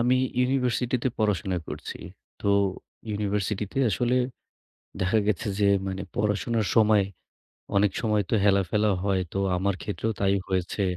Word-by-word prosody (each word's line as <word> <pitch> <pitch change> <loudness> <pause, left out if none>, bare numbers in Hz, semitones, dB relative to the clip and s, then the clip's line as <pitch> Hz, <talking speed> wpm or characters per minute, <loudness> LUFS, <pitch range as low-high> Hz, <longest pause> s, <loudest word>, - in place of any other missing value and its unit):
আমি 125 +2 +3 0.2
ইউনিভার্সিটি 125 -1 +1
তে - - +2
পড়াশোনা 95 -4 0
করছি। - - -6 0.4
তো, 100 - +1 0.6
ইউনিভার্সিটিতে 105 +2 -2
আসলে, 120 +6 +1 0.8
দেখা 95 +4 +2
গেছে 105 0 0
যে 100 - +4 0.2
মানে, 95 0 -3
পড়াশোনার 110 0 0
সময়, 105 -3 +5 0.7
অনেক 100 0 +4
সময় 105 -3 +1
তো - - +2
হেলা-ফেলা 100 +1 +3
হয়। 95 -2 +1
তো 95 - -1 0.2
আমার 100 +1 0
ক্ষেত্রেও 110 +2 -2
তাই 100 0 +3
হয়েছে। 95 +2 -1
105 Hz, 130 wpm, -26 LUFS, 100-110 Hz, 0.8 s, সময়